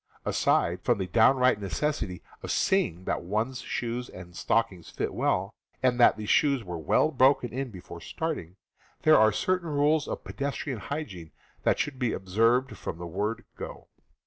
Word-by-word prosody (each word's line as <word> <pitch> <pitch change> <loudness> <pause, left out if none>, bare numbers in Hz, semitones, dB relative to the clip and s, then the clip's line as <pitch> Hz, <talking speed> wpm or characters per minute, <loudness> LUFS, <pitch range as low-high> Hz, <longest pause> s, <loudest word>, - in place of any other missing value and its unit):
Aside - - +1
from - - +2
the 95 - -2
downright 120 +4 +4
necessity 100 - -2 0.2
of - - -7
seeing 175 - +1
that - - -1
one's 110 +8 -2
shoes 120 +1 -3
and 90 -1 -11
stockings 95 -8 0
fit - - -3
well, 95 +3 0 0.3
and 125 -1 +2
that 120 - +6
the 105 - -5
shoes 140 +2 +3
were 90 -3 -5
well 80 - +2
broken 130 -3 +3
in 135 +1 -3
before 90 -4 -10
starting, 155 - -4 0.5
there 155 -4 +7
are 110 0 +6
certain 180 - 0
rules 150 +1 +2
of - - -5
pedestrian 140 -3 -4
hygiene 100 - -6 0.3
that - - +2
should 145 -4 -2
be 125 -4 0
observed 115 +7 +1
from 80 - -5
the 85 - -6
word 100 +6 -3
"go." - - -8
115 Hz, 165 wpm, -28 LUFS, 95-140 Hz, 0.5 s, there